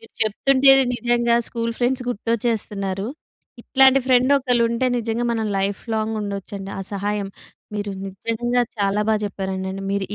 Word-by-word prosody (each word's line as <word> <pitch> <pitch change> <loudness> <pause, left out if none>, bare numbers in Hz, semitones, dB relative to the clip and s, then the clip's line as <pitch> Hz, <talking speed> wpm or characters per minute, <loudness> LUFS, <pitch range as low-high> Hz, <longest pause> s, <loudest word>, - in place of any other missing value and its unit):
మీరు 225 - -18
చెప్తుంటే‌నే 270 +5 +4
నిజంగా 240 -1 +2
స్కూల్ 230 -1 -2
ఫ్రెండ్స్ 250 +1 +1
గుర్తొచ్చేస్తున్నారు. 210 -4 -2 0.5
ఇట్లాంటి 265 +1 +5
ఫ్రెండ్ 255 +1 +4
ఒకళ్ళు 250 -3 +1
ఉంటే 235 +2 0
నిజంగా 230 +1 -2
మనం 220 -1 -1
లైఫ్‌లాంగ్ 215 +3 -2
ఉండొచ్చండి. 200 -1 -5
ఆ - - -3
సహాయం 205 0 -2 0.5
మీరు 205 -1 -3 0.2
నిజంగా 230 +5 -1 0.2
చాలా 200 0 +1
బాగ 220 - +4
చెప్పారండండి. 190 -1 -4
మీరు 200 -1 0
225 Hz, 130 wpm, -22 LUFS, 200-240 Hz, 0.5 s, ఇట్లాంటి